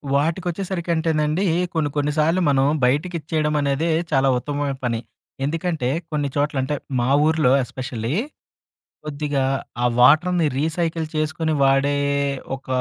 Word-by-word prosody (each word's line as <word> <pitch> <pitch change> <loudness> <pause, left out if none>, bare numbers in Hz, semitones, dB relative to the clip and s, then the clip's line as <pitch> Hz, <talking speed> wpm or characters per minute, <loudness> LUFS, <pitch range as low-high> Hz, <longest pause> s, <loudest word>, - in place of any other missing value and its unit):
వాటికొచ్చేసరికి 175 +4 -2
అంటేనండి. 160 +3 0 0.3
కొన్ని 155 -3 0
కొన్ని 145 +1 +1
సార్లు 165 +4 +2
మనం 135 -1 +3 0.2
బయటకిచ్చేయడం 155 +1 0
అనేదే 140 +4 0 0.2
చాలా 135 -1 +3
ఉత్తమమైన 145 +1 -2
పని. 115 -2 0 0.5
ఎందుకంటే 160 -4 -1 0.2
కొన్ని 145 -1 0
చోట్ల, 145 -1 0
అంటే 145 +3 -1 0.2
మా 120 +2 +1 0.2
ఊర్లో 155 -5 +3
ఎస్పెషల్లీ, 125 0 -4 0.9
కొద్దిగా 145 -2 -2 0.4
ఆ - - +3
వాటర్‌ని 155 +6 +5
రీసైకిల్ 160 0 -1
చేసుకొని 155 +1 -1
వాడే 135 +1 +3 0.6
ఒక 135 - -15
150 Hz, 115 wpm, -22 LUFS, 140-160 Hz, 0.9 s, వాటర్‌ని